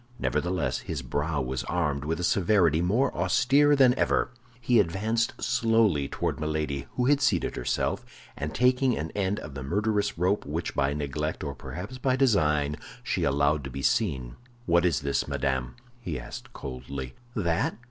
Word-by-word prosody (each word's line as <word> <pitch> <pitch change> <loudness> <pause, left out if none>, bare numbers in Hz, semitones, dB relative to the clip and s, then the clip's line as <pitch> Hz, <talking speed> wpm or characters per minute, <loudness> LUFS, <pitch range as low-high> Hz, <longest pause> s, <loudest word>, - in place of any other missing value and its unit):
Nevertheless, 90 -7 -1
his 75 -5 -5
brow 70 +3 -1
was 65 0 -3
armed 75 -5 -1
with 80 +2 -1
a - - -2
severity 85 -3 +3
more 115 +10 +1
austere 135 +11 +4
than 130 -3 +6
ever. - - +2 0.3
He 120 -1 +3
advanced 110 +5 0
slowly 115 - +2
toward - - -2
Milady, 75 -2 -2
who 125 - 0
had 145 +1 +3
seated 125 - +1
herself, - - -1 0.3
and 75 +2 -4
taking 125 0 +2
an 80 +1 -4
end 100 0 -1
of 75 - -8
the 70 - -6
murderous 105 +8 0
rope 90 +4 +1
which 80 +4 -3
by 70 +1 +1
neglect, 75 +2 -3
or 70 -2 -3
perhaps 100 - -7
by 130 0 +2
design, 75 - +2 0.3
she - - -1
allowed 70 +1 +2
to 70 - -5
be 70 +1 -6
seen, 65 - 0 0.3
"What 85 +1 +3
is 85 -8 +2
this, 70 0 -1
madame?" 65 -2 -1 0.2
he 85 - -4
asked - - -9
coldly. 65 0 -6 0.2
"That? 85 -7 0
85 Hz, 165 wpm, -27 LUFS, 70-110 Hz, 0.3 s, than